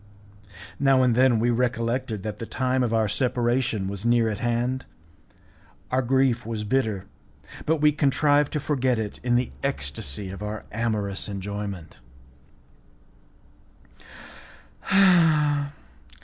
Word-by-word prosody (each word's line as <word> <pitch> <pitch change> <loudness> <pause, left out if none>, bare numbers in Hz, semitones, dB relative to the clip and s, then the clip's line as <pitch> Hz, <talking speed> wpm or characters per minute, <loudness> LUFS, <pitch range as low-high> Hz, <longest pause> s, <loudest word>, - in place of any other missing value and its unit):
Now 135 -2 +4
and 125 -2 +3
then 125 0 +4
we 120 +2 +2
recollected 120 -2 -1
that 105 -1 -5
the 115 - -6
time 130 0 0
of 120 -3 0
our 110 -1 +2
separation 120 -3 0
was 100 0 -5
near 120 -1 +3
at 105 - -4
hand, 120 +2 -1 1.1
our 130 +1 +2
grief 130 -1 +2
was 110 -1 -4
bitter, 110 -4 -1 0.6
but 160 -1 +1
we 150 0 +5
contrived 145 0 +2
to 150 - 0
forget 130 -4 0
it 110 -2 -4
in 120 -1 +1
the 125 +1 0
ecstacy 85 - -4
of 95 +1 -9
our 105 0 -5
amorous 105 -3 -2
enjoyment. 100 -4 -6
120 Hz, 120 wpm, -25 LUFS, 105-130 Hz, 1.1 s, we